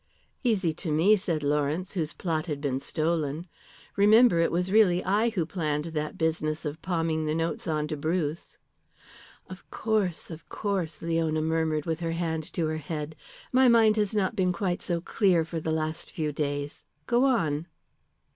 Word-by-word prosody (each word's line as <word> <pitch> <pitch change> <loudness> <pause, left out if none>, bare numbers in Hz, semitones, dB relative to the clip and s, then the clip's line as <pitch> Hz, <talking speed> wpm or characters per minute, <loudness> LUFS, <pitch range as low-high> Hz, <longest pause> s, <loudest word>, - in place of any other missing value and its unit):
"Easy 200 -9 +1
to 160 0 -4
me," 170 +8 +5
said 175 -7 -2
Lawrence, 150 +5 0
"whose 165 -5 -2
plot 160 -2 -2
had 150 -3 -3
been 135 -2 -1
stolen. 155 +1 -1 0.5
Remember 210 -1 +6
it 165 - +2
was 180 +2 -1
really 190 -4 +4
I 210 +5 +2
who 190 -8 -1
planned 155 -3 -2
that 155 -1 -3
business 160 -1 -1
of 150 +1 -4
palming 165 -3 -1
the 155 0 0
notes 165 +1 -2
on 155 -1 0
to 155 - -2
Bruce." 155 +1 -2 0.9
"Of 185 0 -11
course, 205 -7 -1
of 160 0 -10
course," 185 -7 -3
Leona 165 -2 0
murmured 160 -1 0
with 160 -1 -2
her 165 -1 -2
hand 160 -2 -3
to 170 - 0
her 155 0 -1
head. 155 0 -5 0.4
"My 260 0 +6
mind 225 -3 +5
has 210 0 0
not 205 0 +1
been 185 -3 +2
quite 180 -1 -2
so 170 -2 -2
clear 180 -3 +2
for 165 0 -4
the 160 0 -2
last 155 0 -2
few 155 -2 -2
days. 145 -1 -4 0.2
Go 240 - +3
on." 165 - +1
165 Hz, 175 wpm, -27 LUFS, 155-185 Hz, 0.9 s, Remember